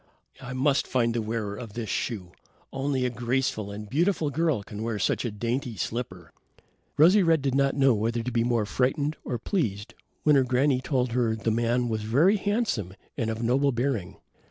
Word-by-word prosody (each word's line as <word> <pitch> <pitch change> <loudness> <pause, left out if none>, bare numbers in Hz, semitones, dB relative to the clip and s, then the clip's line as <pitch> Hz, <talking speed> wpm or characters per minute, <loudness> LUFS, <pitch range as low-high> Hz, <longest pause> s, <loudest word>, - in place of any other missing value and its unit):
"I 125 -1 -6
must 135 +2 +1
find 120 -2 +1
the 115 - -1
wearer 110 -2 -3
of 110 -2 -8
this 115 -1 -4
shoe. 95 -8 -3 0.4
Only 135 -1 -1
a 125 - 0
graceful 120 -3 -1
and 105 +1 -7
beautiful 160 - +1
girl 155 -6 0
can 105 +1 -8
wear 115 -1 -2
such 100 - 0
a - - 0
dainty 115 +3 -3
slipper." 95 -6 -4 0.7
Rosy 180 +7 +6
red 165 -5 +3
did 135 -2 0
not 140 0 +2
know 135 -2 +4
whether 115 +2 -1
to 125 - -3
be 115 -1 +1
more 120 -3 +1
frightened 140 +7 0
or 125 - -3
pleased, 115 - -2 0.3
when 150 -1 +5
her 135 - +5
granny 130 +1 +2
told 130 -3 0
her 115 -2 +1
the 110 0 -1
man 120 +2 +1
was 110 -2 -2
very 145 - +3
handsome 200 - -1 0.2
and 115 - -1
of 110 +1 -3
noble 135 +4 +2
bearing. 115 -7 -2
125 Hz, 190 wpm, -26 LUFS, 110-140 Hz, 0.7 s, Rosy